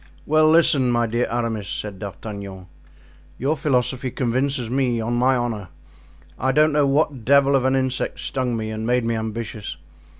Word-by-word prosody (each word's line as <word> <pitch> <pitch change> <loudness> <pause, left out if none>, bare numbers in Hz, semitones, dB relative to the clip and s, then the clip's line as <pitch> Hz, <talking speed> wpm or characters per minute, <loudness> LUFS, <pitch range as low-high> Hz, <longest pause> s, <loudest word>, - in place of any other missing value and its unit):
"Well, 155 +1 +4
listen, 155 -5 +5
my 120 -1 +2
dear 120 +2 0
Aramis," 115 -4 -2
said 105 -3 -5
D'Artagnan; 100 -1 -7 0.7
"your 140 +5 0
philosophy 130 -3 0
convinces 130 +1 -1
me, 125 -1 0
on 115 +2 -2
my 125 +2 +3
honor. 115 -5 -2 0.7
I 130 +2 +1
don't 150 +3 +3
know 145 -1 +3
what 140 -3 +1
devil 140 +2 +4
of 130 -1 +2
an 130 0 +2
insect 130 -1 -1
stung 125 -3 -2
me 110 0 -4
and 110 +1 -4
made 125 -1 +1
me 115 - 0
ambitious. 110 -1 -5
125 Hz, 165 wpm, -22 LUFS, 110-135 Hz, 0.7 s, listen